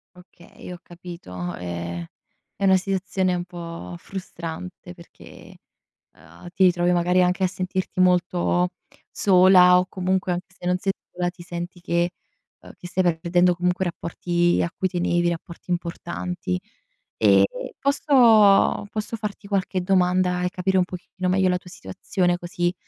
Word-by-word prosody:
Okay, 180 -1 -15
ho - - -8
capito. 170 - -8
Ehm, 85 -1 -5 0.5
è 200 - -1
una 190 - +6
situazione 190 0 -1
un 175 0 -3
po' 170 - -8
frustrante 180 - -8
perché, 170 -1 -15 0.6
ehm, 80 - -14
ti 190 - +4
ritrovi 175 0 +3
magari 180 +1 +3
anche 180 +1 +1
a - - +4
sentirti 185 0 -3
molto 180 0 +2 0.4
sola 180 -1 +6
o 180 - 0
comunque, 185 -1 -1
anche 180 +2 -6
se - - -10
non 180 0 +2
sei 195 - 0 0.2
sola, 175 0 -1
ti 175 -1 -12
senti 175 +1 -6
che, 170 0 0 0.5
ehm, - - -13
che - - -24
ti 175 - -8
stai 185 +1 0 0.2
perdendo 175 +1 +2
comunque 180 +1 0
rapporti 175 0 0
a - - -1
cui 190 - -1
tenevi, 175 -1 +1
rapporti 170 +1 -7
importanti. 175 +1 -3 0.6
E - - +5 0.3
posso 230 -9 +4
posso 215 +1 -4
farti 210 -1 -6
qualche 190 -2 -1
domanda 180 -1 +2
e 180 - +1
capire 190 +1 0
un 185 - +4
pochettino 180 0 -5
meglio 190 0 +2
la 180 - +1
tua 180 - -14
situazione, 175 - -2
così 175 0 -2
180 Hz, 150 wpm, -23 LUFS, 175-185 Hz, 0.6 s, una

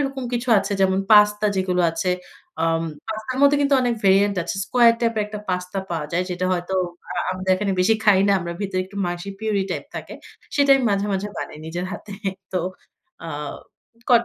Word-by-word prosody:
এরকম 270 -2 -2
কিছু 240 +1 -3
আছে 200 - -2
যেমন 190 0 +3
পাস্তা 210 0 +6
যেগুলো 185 -1 +1
আছে। 165 +3 -1 0.5
আম 165 0 +1 0.3
পাস্তার 220 +4 -4
মধ্যে 285 +1 +6
কিন্তু 280 0 +3
অনেক 245 -1 +1
ভেরিয়ান্ট 200 +1 +4
আছে। 175 - -3
square 235 -1 +5
type 230 -1 0
এর - - +2
একটা 210 0 -7
পাস্তা 180 +1 -3
পাওয়া 165 -3 -2
যায়। 180 +2 +1
যেটা 180 +1 -1
হয়তো 180 +1 -2 0.4
আ - - -2 0.2
আমাদের 185 0 -2
এখানে 200 +1 -1
বেশি 195 +5 +4
খাই 205 -3 +6
না। - - +5
আমরা 170 0 -4
ভিতরে 190 -2 -1
একটু 195 +2 -13
মাসি 175 +2 -4
পিউরি 215 -3 0
টাইপ - - -3
থাকে। - - -7 0.4
সেটাই 280 -1 +5
মাঝে, 200 0 +1
মাঝে 195 +2 -2
বানাই 150 - -6
নিজের 175 +3 -4
হাতে। 205 - -8 0.4
তো 185 - +1 0.7
আ - - -5 0.8
করার 235 -1 +5
195 Hz, 190 wpm, -22 LUFS, 180-220 Hz, 0.8 s, পাস্তা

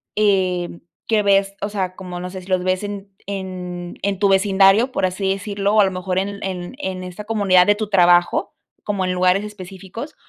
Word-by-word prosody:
eh, 185 -4 +1 0.3
que 220 -2 +3
ves 195 0 +2
o 205 - -2
sea, 190 -3 -3
como 180 -2 -7
no 180 +1 -5
sé 185 0 -8
si 180 - -15
los 185 -1 +1
ves 185 +1 0
en 205 -1 -6 0.2
en 180 -3 -6
en 195 -1 -1
tu 200 - +3
vecindario, 195 +4 +4
por 190 - 0
así 190 +1 -1
decirlo, 200 +1 -1
o 215 - +7
a - - +5
lo 190 - -1
mejor 185 0 -2
en 200 +1 -4
en 185 +3 -5
en 185 -8 -4
esta 180 +3 -8
comunidad 200 -5 +4
de 205 - +5
tu 215 -1 -4
trabajo, 175 -3 +3 0.3
como 200 -3 -1
en 185 - -1
lugares 180 +2 +2
específicos 195 - -9
190 Hz, 205 wpm, -20 LUFS, 185-205 Hz, 0.3 s, o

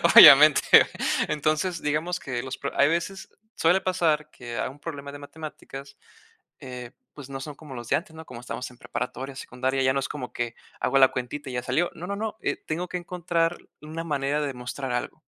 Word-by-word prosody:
obviamente. - - +11 0.7
Entonces, 155 +4 0
digamos 155 +4 -1
que 125 -3 -3
los 130 0 -5
pro 140 - -4
hay 140 - +7
veces 170 +4 -2 0.3
suele 175 +4 +3
pasar 160 -5 +1
que 120 -1 -7
a - - -1
un 135 +3 -13
problema 145 -3 -6
de 145 - -9
matemáticas, 145 -2 -9 0.6
eh, 125 -2 -8 0.2
pues, 140 -2 -10
no 135 0 -5
son 150 +1 -7
como 145 -3 -10
los 120 -1 -7
de - - +4
antes, 160 -1 -9
¿no? 160 0 -9
Como 125 -4 -9
estamos 125 +1 -5
en 125 - -17
preparatoria, 130 +2 -5
secundaria, 130 +1 -2
ya 130 - +4
no 135 - +1
es 135 - -2
como 130 -4 -6
que, 120 -1 -3 0.2
hago 135 - +2
la 130 -1 +8
cuentita 130 +3 -5
y 125 - -6
ya 125 - -2
salió. 135 +8 +1
No, 175 +1 -7
no, 200 - -2
no, 215 +1 -4
eh, - - 0
tengo 170 +3 -2
que - - -6
encontrar 175 -1 -1 0.2
una 155 +2 -6
manera 145 -1 0
de 145 -2 -2
mostrar 125 +1 -5
algo. 120 - -3
145 Hz, 205 wpm, -26 LUFS, 130-165 Hz, 0.7 s, obviamente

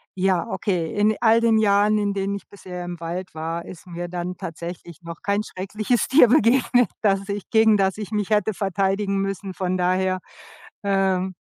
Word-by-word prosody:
ja, 185 -2 +1
okay, 175 -8 -2
in 210 +1 +2
all 225 0 +5
den 230 -1 +3
Jahren, 210 0 +3
in 205 -1 0
denen 200 0 -2
ich 200 - -8
bisher 180 -3 -8
im 175 -1 -6
Wald 175 +2 -5
war, 165 +2 -4
ist 180 0 -11
mir 175 0 -6
dann 180 +1 -4
tatsächlich 170 +1 -8
noch 170 -1 -9
kein 200 +1 0
schreckliches 215 +5 -2
Tier 265 -2 +7
begegnet, 245 - +3
dass 195 -1 +1
ich 200 -1 -4
gegen 220 -2 +5
das 190 0 +1
ich 210 -1 -6
mich 210 -1 -1
hätte 215 0 +2
verteidigen 195 +1 0
müssen. 195 -1 -3
Von 185 0 -2
daher, 185 +1 +1 0.6
ähm. 190 -2 +1
195 Hz, 180 wpm, -23 LUFS, 180-210 Hz, 0.6 s, Tier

